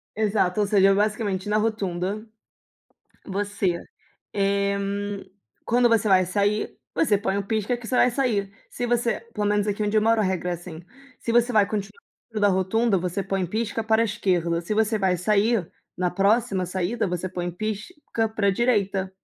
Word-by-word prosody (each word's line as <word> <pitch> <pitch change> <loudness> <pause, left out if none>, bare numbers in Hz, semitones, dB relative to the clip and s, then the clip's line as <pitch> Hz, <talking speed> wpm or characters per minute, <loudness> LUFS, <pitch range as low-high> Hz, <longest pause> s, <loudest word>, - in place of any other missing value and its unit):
Exato, 210 -3 +1
ou 205 - +2
seja, 195 -1 +5
basicamente 205 -2 0
na 210 +1 +2
rotunda, 210 -2 -2 1.0
você, 200 -3 -1 0.6
eh, 200 0 +1
hum, 200 0 -3 0.4
quando 240 +1 +3
você 225 -2 +2
vai 185 -1 +5
sair, 205 +3 0 0.2
você 215 -10 +3
põe 200 0 -1
o - - -1
pisca 220 +2 0
que 240 -1 -10
você 250 - -1
vai 250 - +5
sair. 220 -6 0 0.2
Se 245 - -4
você 240 0 +1
pelo 210 -1 -1
menos 205 0 +1
aqui 205 0 -1
onde 210 +1 0
eu 215 - +4
moro 225 0 +3
a 210 - +2
regra 185 -1 -1
é - - 0
assim. 170 -1 -9 0.4
Se 230 - -2
você 240 +1 +3
vai 210 -2 +5
continuar 210 - -5 0.3
dentro 215 -1 -3
da 205 - +6
rotunda, 195 +3 +2
você 180 +2 -2
põe 195 -1 -1
pisca 220 +4 -2
para 220 +1 +3
a - - +3
esquerda. 180 -6 0
Se 190 +5 -3
você 220 0 +2
vai 185 -2 +2
sair 210 0 +1 0.3
na 180 -1 0
próxima 195 0 +1
saída, 185 +5 -1
você 180 +1 -3
põe 175 -1 -3
pisca 215 - -3
para 215 -2 0
a - - +6
direita. 200 -3 +1
205 Hz, 185 wpm, -24 LUFS, 190-220 Hz, 1.0 s, da